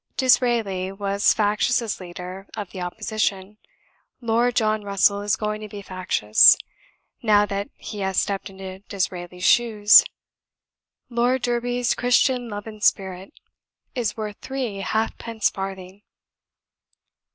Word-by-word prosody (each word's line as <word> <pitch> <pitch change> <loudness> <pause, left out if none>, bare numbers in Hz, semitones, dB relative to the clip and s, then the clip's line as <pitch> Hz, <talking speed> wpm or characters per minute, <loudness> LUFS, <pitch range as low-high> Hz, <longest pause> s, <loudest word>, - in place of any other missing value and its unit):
D'Israeli 230 -7 +2
was 200 0 +1
factious 215 +4 +1
as 230 -3 -4
leader 180 +2 -9
of 205 -3 -6
the 185 - -7
Opposition; 210 +1 -3 0.6
Lord 235 +1 +1
John 215 -1 +1
Russell 200 0 +2
is 205 +1 +1
going 215 -1 -3
to 215 - -7
be 200 0 -9
factious, 185 - +4 0.6
now 210 -2 +4
that 200 0 -4
he 210 - -8
has 190 -1 0
stepped 200 0 -2
into 190 -1 -9
D'Israeli's 180 -2 -4
shoes. 215 -3 +6 1.1
Lord 245 +2 +1
Derby's 245 0 0
'Christian 245 0 +1
love 205 -1 -6
and 215 -1 -10
spirit,' 190 +4 -1 0.5
is 230 -4 -2
worth 210 -2 -5
three 260 -6 -4
half 220 +3 -2
pence 225 -2 -1
farthing." 195 0 -7
205 Hz, 125 wpm, -23 LUFS, 195-230 Hz, 1.1 s, shoes